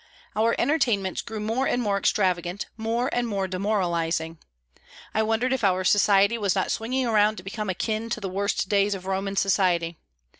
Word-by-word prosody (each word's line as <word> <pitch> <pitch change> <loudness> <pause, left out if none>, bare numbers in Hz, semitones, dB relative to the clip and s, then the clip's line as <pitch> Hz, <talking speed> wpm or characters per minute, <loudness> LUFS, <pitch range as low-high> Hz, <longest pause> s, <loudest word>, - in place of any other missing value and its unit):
Our 225 +2 +2
entertainments 235 - +1
grew 220 -2 -6
more 225 +5 -1
and 245 - +1
more 205 -4 0
extravagant, 185 -1 0
more 230 +2 -1
and 240 0 0
more 195 -3 -1
demoralising. 170 -4 -1 0.7
I 220 - +2
wondered 225 +4 +1
if 260 - -2
our 185 -1 +2
society 200 +3 +4
was 200 -3 +1
not 190 - 0
swinging 255 +3 -1
around 215 -2 +3
to 180 - -9
become 210 +1 -4
akin 220 +4 -2
to 230 - -2
the 200 - -4
worst 195 +1 -1
days 200 0 +2
of 185 -1 -9
Roman 195 +1 -2
society. 180 -4 +1
200 Hz, 175 wpm, -25 LUFS, 190-225 Hz, 0.7 s, society